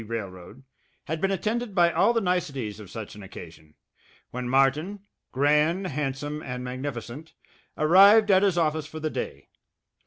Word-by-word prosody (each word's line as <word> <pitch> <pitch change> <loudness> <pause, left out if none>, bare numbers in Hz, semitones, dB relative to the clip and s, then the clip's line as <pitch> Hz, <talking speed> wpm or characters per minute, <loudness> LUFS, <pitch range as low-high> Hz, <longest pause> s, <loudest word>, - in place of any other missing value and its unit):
Railroad, 100 +1 -7 0.4
had 160 +1 -4
been 195 - +1
attended 215 +3 -2
by 170 -2 +4
all 235 - +3
the 230 -1 +1
niceties 140 - -2
of 105 -3 -11
such 110 0 -8
an 105 - -11
occasion, 80 -5 -12 0.6
when 125 0 -4
Martin, 145 +10 +1 0.3
grand, 150 +7 +2
handsome, 145 -1 -3
and 125 -2 -6
magnificent, 130 +3 -6 0.4
arrived 200 +7 +6
at 190 0 +5
his 195 -3 +2
office 155 -2 0
for 155 - -8
the 155 0 -3
day. 70 - -6
150 Hz, 150 wpm, -26 LUFS, 125-180 Hz, 0.6 s, arrived